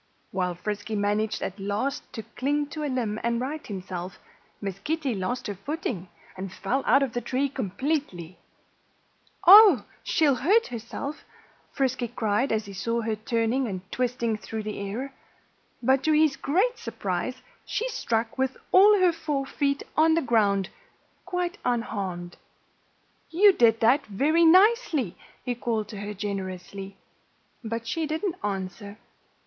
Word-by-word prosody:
While 180 -2 -1
Frisky 210 +4 -4
managed 210 +1 0
at 195 - -5
last 205 +8 -3
to 225 - -5
cling 290 +6 -1
to 305 0 -5
a 295 - -1
limb 230 -5 -2
and 235 0 0
right 290 +5 -4
himself, 185 -2 -6 0.4
Miss 195 -2 -5
Kitty 295 +2 -1
lost 210 +5 -3
her 205 - -3
footing 200 - -4 0.3
and 190 0 -6
fell 240 +9 -1
out 275 +3 +5
of 260 -4 -3
the 240 - -2
tree 265 +3 0
completely. 245 - -3 1.1
"Oh! 385 - +9 0.2
She'll 285 -5 +2
he - - -8
hurt!" 280 - -4 0.6
Frisky 260 -2 -1
cried 220 +3 0
as 220 -1 0
he 200 - -9
saw 230 +5 -1
her 220 -1 -1
turning 230 +4 0
and 185 -4 -4
twisting 235 -3 -1
through 220 0 -5
the 215 0 -5
air. 230 +8 -4 0.7
But 265 +2 +3
to 315 - +4
his 305 -2 +4
great 395 - 0
surprise - - -3 0.3
she 475 - -2
struck 230 - -2
with 265 0 0
all 410 +2 +7
her 365 -1 +5
four 300 -4 -2
feet 280 0 -1
on 320 +1 +5
the 330 - +1
ground, 205 -6 +2 0.6
quite 360 +1 -2
unharmed. 195 -7 -3 0.9
"You 390 +4 +6
did 230 -7 +4
that 250 +6 +4
very 300 +11 +3
nicely," 365 - +4 0.3
he 245 - 0
called 230 -3 -2
to 205 - -7
her 205 +1 -5
generously. 195 -1 -5 0.7
But 230 0 -4
she 320 +6 -2
didn't 330 +4 -2
answer. 200 +1 -4
235 Hz, 145 wpm, -26 LUFS, 205-290 Hz, 1.1 s, Oh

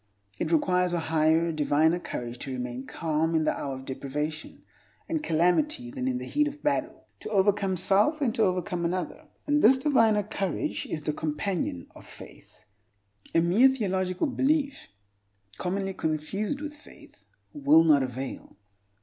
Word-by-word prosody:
It 160 - -2
requires 180 +2 +2
a 175 - +1
higher, 160 +1 +2
diviner 155 +2 +2
courage 120 -7 -6
to 135 - -5
remain 125 0 -5
calm 160 0 -1
in 160 - +2
the - - +1
hour 135 -2 -4
of 130 0 -10
deprivation 145 +4 -5 0.4
and 320 -1 -1
calamity 245 - +1
than 260 -1 -3
in 255 -1 0
the - - -6
heat 295 0 +1
of 295 0 -8
battle, 295 - -1
to - - -7
overcome 200 -2 +2
self 205 - +3
than 275 -6 0
to 225 - -1
overcome 180 -2 0
another. 185 - -3 0.2
And 295 0 +2
this 260 +5 +6
diviner 225 -7 +3
courage 195 -3 -3
is 155 - -4
the 150 - -1
companion 150 - -3
of - - -14
faith. - - -14 0.7
A 165 - +5
mere 190 +10 +5
theological 190 - -1
belief 280 0 0 0.7
(commonly 195 +1 -2
confused 190 - -2
with 300 -1 -5
faith) 295 - -17 0.3
will 150 +3 +5
not 150 -4 +5
avail. 130 -4 -6
180 Hz, 155 wpm, -27 LUFS, 155-245 Hz, 0.7 s, this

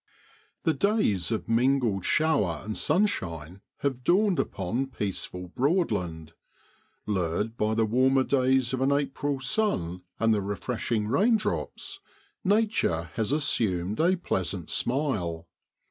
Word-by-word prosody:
HE 160 - +3
days 140 - +1
of 110 - -2
mingled 115 -4 +2
shower 105 - +1
and 110 0 -4
sunshine 95 - -1 0.2
have 130 -3 -1
dawned 190 +4 +3
upon 110 +8 -2
peaceful 95 -6 -3
Broadland. 90 - -1 0.7
Lured 100 +2 -1
by 110 -1 0
the 115 0 +2
warmer 130 +4 +3
days 130 -1 +2
of 130 - -1
an 135 +1 +3
April 140 0 -1
sun 130 - 0 0.2
and 115 -1 +3
the 105 - +1
refresh 100 +5 -4
ing 105 -2 +1
raindrops, 210 - 0 0.4
nature 200 - +1
has 110 +2 -1
assumed 110 - +1
a 175 +4 +4
pleasant 95 - -3
smile. 105 - -1
120 Hz, 120 wpm, -27 LUFS, 95-145 Hz, 0.7 s, a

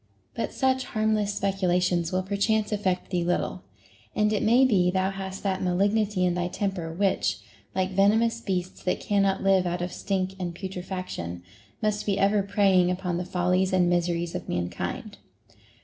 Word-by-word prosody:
But - - -3
such 260 -1 +1
harmless 215 -2 0
speculations 180 -3 +1
will 185 0 0
perchance 210 +2 0
affect 190 -4 -1
thee 175 -2 +1
little, 175 +1 -1 0.5
and 210 0 +2
it 210 - 0
may 245 +4 +5
be 190 -8 +3
thou 190 +1 +1
hast 195 -1 -6
that 190 -2 -1
malignity 200 +1 +1
in 180 - +2
thy 175 0 -1
temper 185 -3 -3
which, 195 +3 +1 0.4
like 185 0 0
venomous 220 +4 +3
beasts 185 -3 -3
that 180 - -1
cannot 195 -2 +1
live 190 -2 +3
out 175 0 -2
of 180 - -4
stink 190 -1 -2
and 175 -2 -4
putrefaction, 180 - -5 0.4
must 210 0 0
be 200 -1 +1
ever 200 +1 +3
preying 195 -2 +3
upon 180 -1 -2
the 180 - -3
follies 180 +1 +1
and 180 -1 +3
miseries 175 -1 0
of - - -5
mankind. 90 0 -4
190 Hz, 165 wpm, -26 LUFS, 180-200 Hz, 0.5 s, may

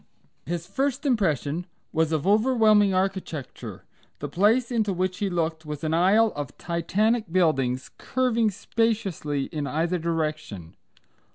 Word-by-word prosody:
His 170 0 -3
first 275 +4 -2
impression 175 - 0 0.3
was 160 -1 +1
of 155 -3 0
overwhelming 215 -1 +4
architecture. 185 -7 -3 0.3
The 145 - -5
place 220 - +2
into 220 -4 +1
which 185 0 -2
he 200 - 0
looked 160 -2 -1
was 150 0 -6
an 155 0 0
aisle 200 +6 +4
of 145 -3 -6
Titanic 205 +5 0
buildings, 135 -8 +1
curving 235 -3 +1
spaciously 195 -9 -1
in 150 -4 -3
either 165 +4 0
direction. 155 - -3
180 Hz, 125 wpm, -25 LUFS, 155-215 Hz, 0.3 s, overwhelming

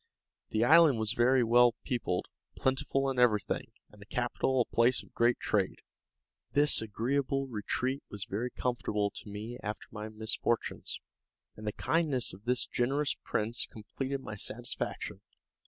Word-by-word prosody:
The 110 +2 +2
island 160 -2 +7
was 110 0 0
very 125 +2 +4
well 120 0 +5
peopled, 110 -9 -1 0.3
plentiful 135 +1 +1
in 130 - -2
everything, 110 -5 +2 0.2
and 105 - -17
the 100 - -12
capital 125 +2 0
a - - -4
place 120 +2 +4
of - - -20
great 120 +1 +3
trade. 100 -3 0 0.7
This 145 -3 +5
agreeable 135 +5 0
retreat 130 +3 -2
was 105 -1 -5
very 115 +6 -2
comfortable 120 -5 -1
to - - -9
me 110 +4 -6
after 105 +1 -5
my 110 0 -6
misfortunes, 110 +1 -1 0.6
and 105 0 -8
the - - +1
kindness 150 -2 +1
of 100 +3 -13
this 125 0 +1
generous 140 +4 0
prince 115 +2 -1
completed 135 +6 -5
my 105 - -7
satisfaction. 120 +4 -3
120 Hz, 145 wpm, -31 LUFS, 110-130 Hz, 0.7 s, island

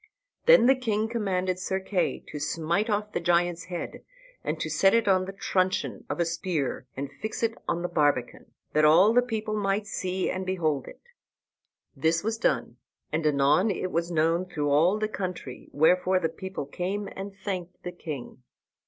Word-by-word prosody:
Then - - +8
the 265 - +7
king 220 -4 0
commanded 185 -5 -1
Sir 190 +1 -1
Kay 190 -1 -1
to 150 - -6
smite 165 +8 0
off 210 0 -1
the - - -1
giant's 175 0 +1
head, 180 -1 -6 0.4
and - - -2
to - - -2
set 195 +2 +4
it 230 -2 +2
on 185 -1 +3
the 195 - -5
truncheon 190 -1 -1
of - - -3
a 170 - +3
spear, 165 -6 -2
and 140 0 -4
fix 220 +2 -4
it 230 0 +2
on 170 - -1
the - - 0
barbican, 145 -7 0 0.2
that 155 - +3
all 175 +8 +6
the 245 - +6
people 220 -3 -3
might 200 0 0
see 185 -2 -2
and 185 - -3
behold 160 -7 -1
it. - - -12 0.9
This 165 +2 +1
was 225 +1 -1
done, - - 0 0.3
and 155 +1 0
anon 150 +7 +3
it 185 -1 -2
was 170 +1 0
known 165 +2 +1
through 150 -5 -1
all 170 +8 +4
the 215 0 0
country, 180 -11 -6
wherefor 180 +5 +3
the 165 -3 0
people 190 -1 -6
came 190 +7 -3
and 195 +1 -6
thanked 185 -3 -5
the 180 - -4
king. 145 -7 -7
185 Hz, 180 wpm, -27 LUFS, 160-200 Hz, 0.9 s, Then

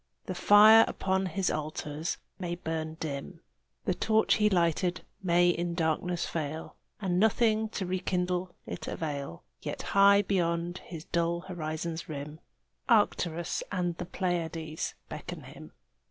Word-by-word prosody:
The 185 - -3
fire 215 +4 +8
upon 190 0 0
his 185 +2 0
altars 155 +1 -3 0.2
may 175 -2 -2
burn 160 -2 -4
dim, 155 +3 -5 0.4
The 185 - +2
torch 220 +4 +3
he 210 0 +4
lighted 175 -1 +1 0.2
may 175 -1 +4
in 175 0 -2
darkness 170 +1 0
fail, 160 0 -4 0.2
And 185 -3 0
nothing 220 +1 +3
to 200 -3 -3
rekindle 180 0 -1
it - - -6
avail, 140 - -4 0.2
Yet - - -5
high 200 +1 +7
beyond 175 -2 0
his 165 -3 -9
dull 170 0 0
horizon's 165 -1 -4
rim, 150 +1 -6 0.5
Arcturus 175 -7 +2
and 180 -3 -1
the 180 - -5
Pleiads 165 -4 -2
beckon - - -7
him. - - -12
175 Hz, 130 wpm, -29 LUFS, 160-190 Hz, 0.5 s, fire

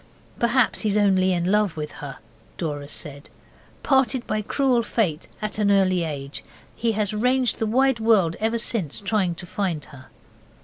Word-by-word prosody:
'Perhaps 235 +1 +2
he's 210 -2 +1
only 190 -2 +3
in 175 +1 0
love 210 -5 +2
with 150 -1 -4
her,' 140 -2 -8 0.4
Dora 145 -4 -4
said, 145 -1 -7 0.5
'parted 265 -2 +2
by 215 - -1
cruel 255 +2 +1
Fate 195 -8 -1 0.2
at 215 0 -2
an 205 -1 +2
early 185 -3 +3
age, 140 -3 -5 0.3
he 230 -1 0
has 210 0 0
ranged 250 +3 +1
the 225 - 0
wide 260 +2 +2
world 210 -7 +3
ever 225 +2 +1
since 215 - -1
trying 195 -4 0
to 175 - -8
find 175 -5 -2
her. 135 -3 -14
205 Hz, 165 wpm, -24 LUFS, 165-225 Hz, 0.5 s, only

